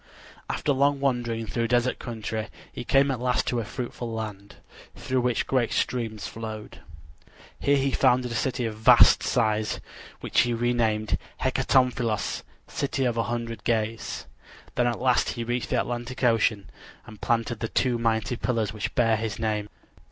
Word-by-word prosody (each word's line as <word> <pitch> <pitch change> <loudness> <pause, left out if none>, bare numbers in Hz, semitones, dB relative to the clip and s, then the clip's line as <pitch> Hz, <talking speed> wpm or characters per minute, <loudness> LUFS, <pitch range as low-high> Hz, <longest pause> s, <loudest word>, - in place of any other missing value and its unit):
After 145 - 0
long 140 +1 +2
wandering 120 -4 0
through 115 +3 -1
desert 120 +1 +1
country 110 -2 -4 0.3
he - - -5
came 135 +3 +3
at 130 - -2
last 125 0 +1
to 120 - 0
a - - -1
fruitful 120 +1 -5
land, 105 -3 -6 0.4
through 130 -1 -1
which 125 -1 +1
great 125 -4 +1
streams 115 -4 -1
flowed. 110 -1 -7 0.8
Here 140 0 +3
he 135 0 +1
founded 125 -2 +3
a - - -3
city 125 +1 -1
of 110 - -2
vast 120 +3 +7
size, 110 -3 0 0.4
which - - 0
he 120 0 +3
named 115 -3 +1 0.2
Hecatompylos 125 -4 +1 0.3
(City 135 -1 -1
of 120 -2 +1
a 115 - +1
Hundred 115 -1 -4
Gates). 110 -1 -1 0.5
Then 120 - +2
at 120 -2 -1
last 125 -1 +2
he 120 - -4
reached 120 +1 -2
the - - +2
Atlantic 120 +2 -4
Ocean 110 -4 +2 0.3
and 110 -1 -13
planted 115 -1 0
the 115 - -2
two 120 0 +1
mighty 115 0 0
pillars 115 -5 -1
which 105 -1 -4
bear 115 -2 +3
his 110 0 -3
name. 105 -2 -1
120 Hz, 160 wpm, -26 LUFS, 110-125 Hz, 0.8 s, vast